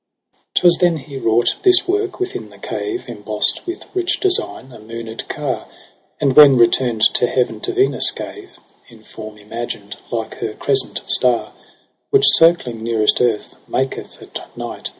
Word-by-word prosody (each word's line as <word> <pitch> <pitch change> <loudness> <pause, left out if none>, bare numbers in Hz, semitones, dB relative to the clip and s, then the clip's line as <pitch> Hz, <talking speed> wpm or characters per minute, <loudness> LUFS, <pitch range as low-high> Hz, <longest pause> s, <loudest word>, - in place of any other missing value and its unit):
'Twas 175 -1 +5
then 175 -2 +3
he 140 -1 -11
wrought 120 -2 +1
this 370 -1 +4
work 395 0 -1
within 380 0 -4
the - - -17
cave, 375 -3 -5
Emboss'd - - +3
with 350 +2 -6
rich 355 -2 -1
design, 365 - -1
a 120 - -13
mooned 115 +1 -8
car - - -4
j - - -25 0.5
And 135 -3 +1
when 145 -3 +8
returned 115 -1 +2
to 125 - +2
heaven 125 0 -1
to 380 - -3
Venus 390 +2 +2
gave, 400 -2 -9 0.4
In 115 -2 -18
form 110 -1 -11
imagined 115 +3 -7
like - - -5
her - - -4
crescent - - -1
star; 125 -2 +1 0.6
Which 410 -1 +3
circling 165 -9 +3
nearest 110 -1 +1
earth, 115 -4 0
maketh 135 0 -4
at - - -11
night - - -6
130 Hz, 155 wpm, -18 LUFS, -, 0.6 s, when